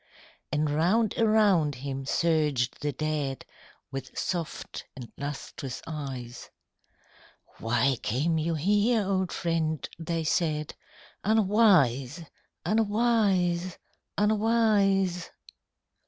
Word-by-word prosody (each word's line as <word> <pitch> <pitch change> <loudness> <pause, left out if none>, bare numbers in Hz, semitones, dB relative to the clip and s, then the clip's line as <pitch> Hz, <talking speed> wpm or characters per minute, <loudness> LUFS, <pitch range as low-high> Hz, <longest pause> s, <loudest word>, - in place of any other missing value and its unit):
And 150 +1 +1
round 180 +9 +2
around 205 -9 +3
him 135 +1 -5
surged 150 -7 +1
the 145 0 -1
dead 145 -1 -3 0.5
With 135 -1 -7
soft 170 -4 -4
and 125 -3 -9
lustrous 140 -2 -6
eyes. 135 -6 -6 1.1
"Why 120 +4 +1
came 150 +9 0
you 165 +1 -1
here, 205 +7 +2
old 190 -2 0
friend?" 160 -2 -1
they 165 0 -2
said: 155 -2 0 0.5
"Unwise... 185 - +3 0.4
unwise... 205 -5 +1 0.4
unwise! 205 -4 +2
165 Hz, 85 wpm, -27 LUFS, 145-205 Hz, 1.1 s, around